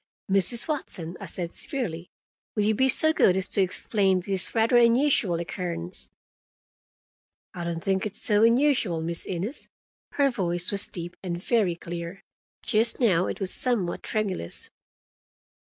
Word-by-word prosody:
"Mrs. 195 - +5
Watson," 185 - -4
I - - -8
said 175 -2 -4
severely, 180 - -4 0.5
"will 210 - +1
you 215 +1 +2
be 265 +5 +2
so 315 +4 +6
good 185 -10 +3
as 190 - 0
to 200 - +3
explain 190 0 +1
this 190 +3 -3
rather 230 +2 +3
unusual 235 - +3
occurrence?" 170 0 -6 1.4
"I 175 -2 -6
don't 170 -1 -4
think 190 +1 0
it 210 - -11
so 210 0 +1
unusual, 230 - +2
Miss 170 +1 -3
Innes." 190 - -5 0.4
Her 280 -1 +2
voice 175 -5 0
was 200 0 0
deep 175 0 -7
and 175 -2 -4
very 190 -2 0
clear: 170 +2 -8 0.4
just 225 +1 +2
now 185 -8 +2
it - - -5
was 195 -2 0
somewhat 225 -9 -1
tremulous. 200 - -4
190 Hz, 145 wpm, -25 LUFS, 175-230 Hz, 1.4 s, so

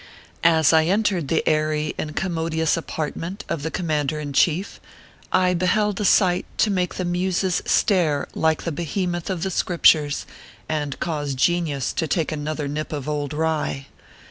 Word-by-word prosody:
As 160 -2 +5
I 160 0 +5
entered 190 -4 +1
the 165 - +1
aiiy 155 0 +1
and 150 -1 -5
commodious 160 -3 0
apartment 165 +4 -5
of 160 - -3
the 160 - -2
command 155 -5 -1
er 155 - -4
in 145 -2 -5
chief, 170 +7 +1 0.5
I 180 -1 +3
beheld 200 +4 +1
a - - 0
sight 180 -2 +3
to 215 - +3
make 180 -2 -1
the 185 - -2
muses 180 +1 0
stare 165 -8 +2
like 160 -1 +1
the 170 - -2
behemoth 175 +3 -3
of 180 -3 -2
the 190 - -1
Scriptures, 155 -5 +3 0.4
and 145 -3 -3
cause 145 -5 -2
genius 155 -2 0
to 160 - -1
take 165 -2 0
another 150 -1 -3
nip 150 +2 -4
of 145 -3 -4
old 150 -1 -2
rye. 150 -3 -2
160 Hz, 165 wpm, -23 LUFS, 150-180 Hz, 0.5 s, As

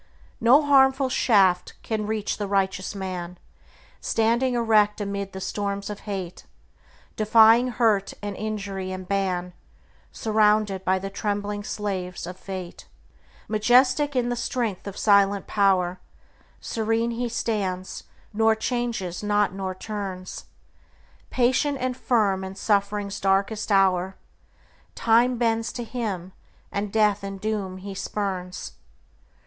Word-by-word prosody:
No 255 +6 +6
harmful 270 -1 +4
shaft 195 -8 +3
can 215 -2 -2
reach 215 -1 -2
the 205 - -2
righteous 195 0 -1
man, 180 -2 -5 0.6
Standing 235 +3 +1
erect 215 -3 +3
amid 200 -1 -3
the 190 - -7
storms 200 +1 -3
of 205 - -7
hate, 185 -3 -5 0.7
Defying 225 +3 +6
hurt 220 -5 +1
and 205 -1 -5
injury 200 -3 -4
and 185 -1 -6
ban, 185 -2 -1 0.6
Surrounded 210 -3 +2
by 190 0 +2
the 195 +1 -5
trembling 205 0 -3
slaves 190 -5 -4
of 180 +1 -7
Fate. 185 -2 -8 0.6
Majestic 250 +6 +3
in 245 -1 +1
the 245 - -1
strength 235 -5 -2
of 200 - -7
silent 200 -1 +3
power, 185 -3 +2 0.6
Serene 225 +1 -1
he 240 +1 -2
stands, 195 -5 -3 0.3
nor 220 +1 +3
changes 220 -6 -2
not 205 -2 +1
nor 190 -1 -4
turns; 190 -2 -6 0.8
Patient 260 +3 +1
and 255 0 -1
firm 210 -7 +1
in 190 0 -6
suffering's 200 0 0
darkest 200 +3 0
hour, 190 -1 +3 0.8
Time 235 +2 +3
bends 230 -1 0
to 240 - -5
him, 205 -7 -4 0.4
and 200 0 -3
death 210 -2 +2
and 195 0 -6
doom 200 -3 -3
he 195 +1 -7
spurns. 190 -2 -4
205 Hz, 120 wpm, -25 LUFS, 190-225 Hz, 0.8 s, No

